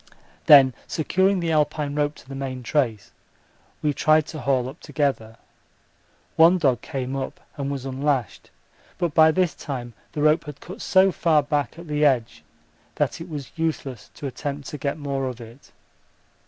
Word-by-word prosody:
Then 135 -3 +8
securing 190 +4 +1
the 165 -1 -1
Alpine 150 -1 0
rope 145 0 0
to - - -17
the 135 - -8
main 130 -2 -5
trace 115 -6 -1 0.7
we 150 -1 +2
tried 155 +2 +3
to 155 - -6
haul 130 -1 +1
up 135 +5 -9
together. 125 -7 -2 1.0
One 170 +3 +6
dog 130 -8 +2
came 135 0 -4
up 135 -1 -4 0.2
and 140 -2 -3
was 135 -2 -4
unlashed, 135 -3 -2 0.5
but 175 -4 -1
by 160 0 +7
this 175 -1 +1
time 120 -4 -6 0.2
the 150 - -2
rope 155 +2 +3
had 150 -1 -9
cut 185 +4 -10
so 190 0 +4
far 155 -4 +2
back 145 0 -1
at 170 0 -10
the 150 0 0
edge 130 -6 +1 0.5
that - - -1
it 170 - -8
was 145 -5 -6
useless 140 -9 -3
to - - -8
attempt 140 +1 -5
to 150 - -7
get 140 +2 -2
more 140 -2 -2
of 125 -1 -6
it. 115 +3 -13
145 Hz, 170 wpm, -24 LUFS, 130-155 Hz, 1.0 s, Then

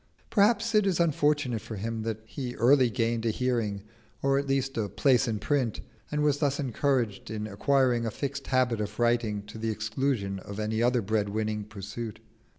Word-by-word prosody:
Perhaps 225 +2 +3
it 210 -2 +4
is 185 -3 +1
unfortunate 145 -7 +2
for 110 - -7
him 110 +3 -3
that 110 -1 -3
he 125 +1 -5
early 130 +2 +5
gained 115 -1 0
a 115 - +1
hearing, 110 -4 -1 0.4
or 135 0 +3
at 140 - -3
least 135 0 0
a 105 -3 -1
place 135 +2 +3
in 110 -2 0
print, 130 -1 0 0.3
and 150 0 0
was 145 -1 +2
thus 145 -1 +1
encouraged 130 -6 0
in 105 -1 -3
acquiring 120 +3 +2
a - - +1
fixed 140 +4 -4
habit 125 -4 +2
of 105 0 -5
writing, 120 -3 +1
to 105 +2 -10
the 110 0 -1
exclusion 110 -2 -1
of 100 +2 -8
any 110 +1 -1
other 120 -1 +2
bread 105 0 0
winning 105 0 -2
pursuit. 110 +2 -7
120 Hz, 185 wpm, -28 LUFS, 110-135 Hz, 0.4 s, early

